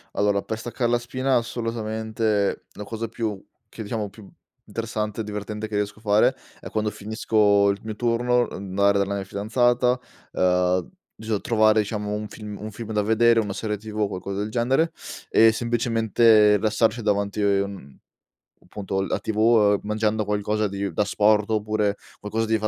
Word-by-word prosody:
Allora 100 -1 +1
per 110 0 -4
staccar 120 +1 -2
la 120 - +2
spina, 130 +2 -1
assolutamente, 110 -3 -2
la 105 - -7
cosa 115 +2 -5
più 110 -3 -4 0.2
che 110 - -10
diciamo 105 -1 -3
più 105 -2 -14 0.4
interessante 110 -1 -3
e - - -3
divertente 105 +1 -5
che 110 - -13
riesco 105 +1 -1
a - - -17
fare 105 0 +3 0.2
è, - - -9
quando 110 -1 -1
finisco 105 -1 +2
il 100 0 -1
mio 110 -1 -5
turno, 120 +1 +1
andare 100 +1 +1
dalla 100 0 0
mia 100 - -3
fidanzata, 120 +5 +1 0.3
uhm, 90 0 +2 0.3
bison 110 -2 -3
trovare 110 -1 +3
diciamo 105 0 -2
un 105 0 -3
film 105 -1 -8
un 110 - -5
film 110 +1 -7
da 105 - +2
vedere, 115 +2 +4
una 105 -3 -2
serie 105 +1 -3
tv 110 +1 -6
o 105 - +2
qualcosa 100 +1 -5
del 105 +1 -3
genere 130 +8 +1 0.4
e 115 0 +6
semplicemente 115 -2 +3
rilassarci 110 +2 +1
davanti, 100 -1 0
mhmm, 100 -8 -1 0.7
appunto 95 -2 -3
la 95 - -1
tv, 110 - -4
uhm, 110 -2 +4
mangiando 110 0 0
qualcosa 105 +1 0
di 100 0 -4
d'asporto 105 +1 +2
oppure 105 -1 0 0.2
qualcosa 110 +2 -2
di 110 0 +1
fa 110 - -1
105 Hz, 165 wpm, -24 LUFS, 100-115 Hz, 0.7 s, e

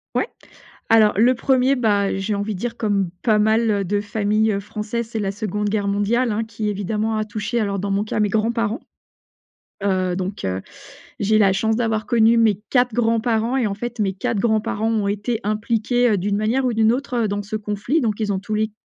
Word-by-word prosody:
Ouais. - - +1 0.6
Alors 220 -2 +5
le 245 +4 +4
1er, 260 +1 +2
bah, 205 -5 +1
j'ai 195 +2 -2
envie 205 0 -2
de - - -8
dire 240 +1 -4
comme 200 -4 0
pas 215 -3 +3
mal, 220 +2 +3
heu, 200 -1 0
de 205 +3 0
familles, 210 +1 0
heu, 200 - -1
françaises, 215 +3 -4
c'est 225 - -2
la 195 -2 -1
2de 210 0 -2
guerre 205 -1 -1
mondiale, 215 +4 +1
hein, 215 +2 -1
qui 220 -1 -3
évidemment 210 +2 -1
a 215 - -1
touché 215 +2 -3
alors 200 -2 -1
dans 200 +1 -2
mon 200 +1 +1
cas 215 - -3
mes 210 -1 +2
grands-parents. 230 +2 0 1.1
Heu, 185 -2 0
donc, 190 +1 -4
heu, 95 0 -2 0.6
j'ai 215 +2 +2
la 195 -2 +5
chance 220 +3 +1
d'avoir 220 -3 0
connu 230 0 +4
mes 215 -3 +3
4 245 -2 +3
grands-parents 230 +1 +1
et 240 -5 +1
en 200 - -2
fait 240 +2 -6
mes 195 -2 +1
4 195 +2 -2
grands-parents 220 0 0
ont 210 -3 0
été 210 +3 -2
impliqués, 230 +3 +1
heu, 205 - +2
d'une 200 +2 -1
manière 230 +5 +1
ou 245 - +1
d'une 220 0 +3
autre, 250 -3 -2
heu, - - +1
dans 205 0 -3
ce 210 +2 -5
conflit. 210 +8 -1
Donc 220 -4 -1
ils 210 -2 0
ont 190 - -1
tous 215 +2 -4
les 215 0 0
215 Hz, 215 wpm, -21 LUFS, 205-230 Hz, 1.1 s, Alors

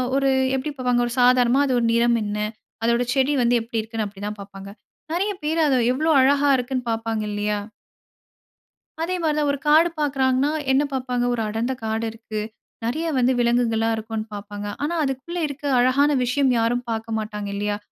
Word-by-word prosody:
ஒரு 275 0 +2 0.3
எப்டி 265 +3 -2
பார்ப்பாங்க? 250 -1 +1
ஒரு 240 - -4
சாதாரணமா 250 +1 +4
அதோட 250 -3 +1
நிறம் 235 0 +3
என்ன? 205 0 -3 0.5
அதோட 235 +1 +2
செடி 270 +1 +2
வந்து 240 0 +3
எப்படி 225 0 -3
இருக்குன்னு, 220 0 -4
அப்டிதான் 205 +1 -6
பார்ப்பாங்க. 195 0 -10 0.4
நெறைய 390 +5 0
பேரு 315 +2 0
அத 275 - +3 0.2
எவ்வளோ 310 +5 +1
அழகாக 280 +1 +4
இருக்குன்னு 255 0 -2
பார்ப்பாங்க 225 -1 -2
இல்லியா? 210 0 -1 1.5
அதே 365 +2 -1
மாதிரி 305 -2 +1
தான். 295 - +1
ஒரு 280 - -2
காடு 315 +3 +6
பார்க்குறாங்கன்னா, 270 -1 +1 0.2
என்ன 270 +2 +3
பார்ப்பாங்க? 250 -2 -1
ஒரு 235 - -1
அடர்ந்த 225 +4 -2
காடு 220 +1 -1
இருக்கு. 220 -1 -6 0.5
நெறைய 310 +8 -1
வந்து, 255 0 +3
விலங்குகள்லாம் 235 -2 +2
இருக்குன்னு 220 0 -4
பார்ப்பாங்க. 205 0 -6 0.2
ஆனா 325 +4 -1
அதுக்குள்ள 285 +6 -3
இருக்க 285 +1 -9 0.2
அழகான 260 +4 +4
விஷயம், 265 +2 +1
யாரும் 240 +2 0
பார்க்க 225 0 -3
மாட்டாங்க. 210 -1 -5
இல்லியா? 205 0 -1
245 Hz, 165 wpm, -23 LUFS, 225-275 Hz, 1.5 s, காடு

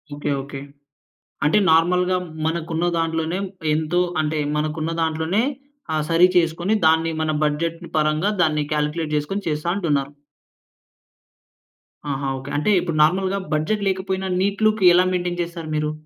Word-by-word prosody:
Okay. 145 0 -3
Okay. 140 0 -8 0.9
అంటే 155 +8 +4
నార్మల్‌గా 180 +3 +3 0.3
మనకు 165 0 -2
ఉన్న 170 +2 0
దాంట్లోనే 165 +1 -1 0.4
ఎంతో 160 +3 0 0.2
అంటే 155 0 -1 0.2
మనకున్న 155 +1 -2
దాంట్లోనే 160 +6 0 0.5
ఆహ్, 155 -1 0
సరి 170 +2 +6
చేసుకొని 175 +4 +1
దాన్ని 160 +1 +3
మన 155 0 0
బడ్జెట్‌ని 165 +3 -2
పరంగా 155 +5 +1
దాన్ని 155 -2 +2
కాలిక్యులేట్ 150 +1 -1
చేసుకొని 170 +8 -2
చేస్తా 150 +2 -2
అంటున్నారు. 145 -7 0 2.0
ఆహా! 135 0 -2
ఓకే. 135 +2 -8
అంటే 150 +8 +1
ఇప్పుడు 170 -3 -3
నార్మల్‌గా 190 +4 +1
బడ్జెట్ 200 +7 0
లేకపోయినా 190 0 -2
నీట్ 200 +2 0
లుక్ 215 -2 0
ఎలా 180 +1 +5
మెయింటేన్ 175 -1 -2
చేస్తారు 170 -2 -6
మీరు? 150 0 0
165 Hz, 135 wpm, -22 LUFS, 155-180 Hz, 2.0 s, సరి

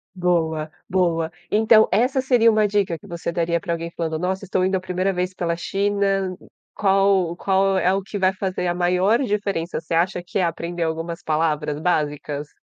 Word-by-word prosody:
Boa, 160 -3 0 0.2
boa. 170 -3 +1 0.2
Então 220 +1 +5
essa 250 +6 +2
seria 240 -3 +4
uma 215 -1 +3
dica 195 -4 0
que - - -15
você 170 0 -4
daria 170 0 0
para 170 - -2
alguém 165 0 -4
falando: 160 -2 -3
"Nossa, 190 +2 -2
estou 185 0 0
indo 190 - +1
a 185 - +1
primeira 185 +1 -1
vez 180 +1 -2
pela 170 -2 -2
China." 195 0 0 0.4
Qual 195 -3 +2
qual 195 0 +2
é 185 0 +2
o 195 - 0
que 205 +1 -6
vai 190 0 +2
fazer 185 -1 -3
a 175 - +1
maior 180 +6 +2
diferença? 200 - -2
Você 165 +1 -6
acha 175 +1 +1
que 175 - -3
é 185 - +2
aprender 170 +1 -2
algumas 165 +1 -3
palavras 150 -1 0
básicas? 150 -3 -2
180 Hz, 185 wpm, -22 LUFS, 165-195 Hz, 0.4 s, Então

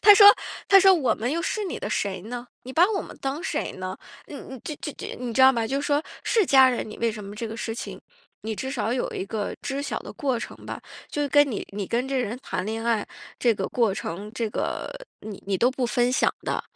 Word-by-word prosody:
她 415 0 +9
说 405 0 +9 0.4
她 390 -1 +9
说： 385 0 +8
“我 300 -8 +2
们 240 +4 -2
又 335 +2 -1
是 425 +3 -1
你 365 - -4
的 - - -4
谁 190 -3 -1
呢？ 240 +3 -6 0.2
你 260 - -8
把 335 +6 +6
我 - - -1
们 - - -11
当 275 +5 -2
谁 305 -5 -2
呢？ 185 0 -5 0.3
你 295 - -10
你 265 -1 -9
知 305 - -4
知 295 - -6
知 - - -6
你 245 -2 -4
知 260 - +5
道 265 0 +9
吗？ 230 -2 0
就 275 +4 -1
是 - - -3
说 290 +1 +2 0.2
是 450 -4 +3
家 265 -1 +7
人 245 - -2
你 215 - -8
为 230 0 +2
什 210 - -7
么 200 +1 -8
这 230 - -3
个 225 - -6
事 225 -1 -3
情， - - -6 0.4
你 220 0 -3
至 265 +5 -4
少 235 -3 -1
有 255 - -1
一 - - -3
个 210 0 -3
知 275 +1 -2
晓 285 - -2
的 - - -9
过 265 -4 -1
程 235 - -6
吧， - - -6 0.3
就 290 -1 -1
跟 290 +1 +5
你 215 - -4
你 200 -1 -3
跟 245 +3 0
这 270 - -1
人 245 -1 -1
谈 185 - -3
恋 225 +2 -3
爱 225 -3 +1 0.3
这 240 -2 +4
个 195 -2 -2
过 230 -5 +2
程， 200 +3 -5
这 230 -1 -2
个 - - -2 0.3
你 210 -2 -8
你 195 -2 0
都 245 - +5
不 255 -1 -1
分 245 0 +2
享 - - +3
的， - - -1
245 Hz, 275 characters per minute, -25 LUFS, 220-280 Hz, 0.4 s, 她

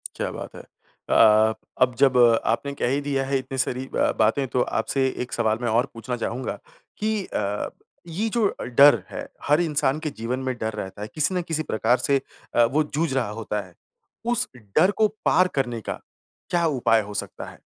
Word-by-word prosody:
क्या - - -3
बात - - -8
है। - - -8 0.5
अ - - +2
अ, 110 0 +6 0.3
अब 125 -1 +4
जब 135 -2 +4 0.3
आपने 140 +5 0
कह 140 - -1
ही 140 +3 0
दिया 140 -2 -1
है 135 0 +1
इतनी 130 0 -7
सारी 130 0 -1
ब-बातें, 115 +5 +2
तो 125 0 0
आपसे 135 +2 0 0.2
एक 125 - -10
सवाल 110 -2 +1
मैं 120 - -1
और 115 +4 +3
पूछना 125 +2 -4
चाहूँगा 120 +2 -4 0.4
कि 215 -2 -1
अ, 100 +1 -2 0.4
ये 185 +7 -2
जो 225 -2 +2
अ, - - -6
डर 125 -3 +6
है, - - -6 0.2
हर 150 +2 +3
इंसान 150 -3 +1
के 155 -1 -3
जीवन 120 +3 -2
में 130 -1 -2
डर 110 -1 -3
रहता 100 -1 -6
है, 105 - -4
किसी 155 +4 +1
ना 180 - +1
किसी 160 -2 -2
प्रकार 120 -2 +1
से 135 +2 +1 0.3
अ, 120 - +6
वो 145 +6 +1
जूझ 150 0 -2
रहा 130 -5 0
होता 105 -1 -3
है। 90 - -20 0.5
उस 240 +1 +1
डर 125 - +2
को 215 +1 +3 0.2
पार 185 - +4
करने 120 -4 -1
का - - -5 0.5
क्या 175 -1 +1
उपाय 120 -6 +2
हो 105 0 -8
सकता 100 - -5
है? - - -15
130 Hz, 205 wpm, -24 LUFS, 115-150 Hz, 0.5 s, अ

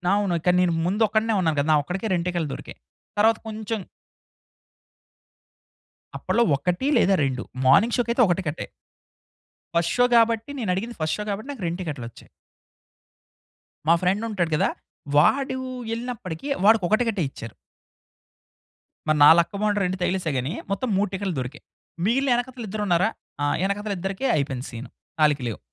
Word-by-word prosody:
అవును. 200 -4 +1
కానీ, 180 0 +4
నేను 175 -2 +2
ముందు 195 +5 -1
ఒక్కడినే 220 +2 +1
ఉన్నాను 160 -4 +1
కదా! 140 - 0
నా - - +5
ఒక్కడికే, 185 +8 -3
2 175 -1 0
టికెట్లు 170 -4 -2
దొరికాయి. - - -9 0.4
తరువాత 220 +2 +4
కొంచెం 220 0 -4 2.4
అప్పట్లో 235 - +1
1 180 - -1
లేదా, 195 -3 +4
2 130 -2 -2 0.2
మార్నింగ్ 215 - +5
షోకైతే 240 +1 +1
ఒక 175 - +2
టికట్టే. 160 -4 -4 1.1
ఫస్ట్ 170 0 +1
షో 245 - +5
కాబట్టి, 230 +1 +2
నేనడిగింది 220 +2 -2
ఫస్ట్ 155 0 0
షో 210 - -3
కాబట్టి, 215 +7 -5
నాకు 255 -9 -8
2 170 +2 -3
టికెట్‌లొచ్చాయి. 135 -9 -7 1.6
మా 165 - +6
ఫ్రెండుంటాడు 190 -2 0
గదా! - - +2 0.5
వాడు 265 - +3 0.4
ఎళ్ళినప్పటికీ 230 - -5 0.2
వాడికొక 210 -2 +5
టికెటే 220 -7 0
ఇచ్చారు. 115 -4 -10 1.5
మరి 155 0 +3
నా 145 - +10
లక్కు 170 +4 -1
బావుండి, 210 -1 +1
2 185 +1 -2
తగిలేసాయి 180 -6 -1
గాని. 130 +6 -3 0.2
మొత్తం 230 +6 -1
3 205 0 +1
టికెట్లు 190 -2 -2
దొరికాయి. 130 +4 -8 0.4
మిగిలిన 265 +6 +2
ఎనకతల 245 0 -4
ఇద్దరు 210 +1 -3
ఉన్నారా? 180 +3 +3 0.4
ఆహ్, 145 - +1
వెనకాతల 200 +2 -1
ఇద్దరికి 195 +8 -2
అయిపోయింది 135 -3 -2
సీను. 120 +2 -8 0.3
ఆళ్ళికి 145 -3 +3
లేవు. 110 - -6
190 Hz, 145 wpm, -24 LUFS, 165-225 Hz, 2.4 s, నా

